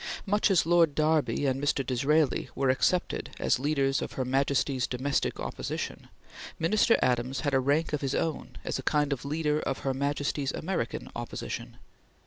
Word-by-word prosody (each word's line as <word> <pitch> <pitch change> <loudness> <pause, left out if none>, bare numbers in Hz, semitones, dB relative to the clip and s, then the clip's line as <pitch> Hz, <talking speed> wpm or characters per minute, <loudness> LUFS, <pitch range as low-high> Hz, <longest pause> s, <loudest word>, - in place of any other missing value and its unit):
Much 205 +1 +2
as 185 -5 +4
Lord 165 -3 +4
Derby 155 -2 +2
and 135 0 0
Mr. 140 -1 +1
Disraeli 140 +4 +1
were 135 -1 +2
accepted 175 +7 0
as - - +1
leaders 135 -1 +1
of - - -5
Her 130 - -2
Majesty's 135 0 +1
domestic 135 +3 -1
Opposition, - - -4 0.5
Minister 215 +8 +3
Adams 125 +1 0
had 145 -2 -1
a 135 - +4
rank 145 +5 +1
of 150 - 0
his 135 -2 -1
own 160 -2 -2
as - - -2
a - - -3
kind 145 -1 +1
of 135 -1 -6
leader 150 +1 0
of 135 -3 -2
Her 135 - +1
Majesty's 140 0 -1
American 160 -9 -3
Opposition. 120 0 -5
140 Hz, 165 wpm, -28 LUFS, 135-155 Hz, 0.5 s, as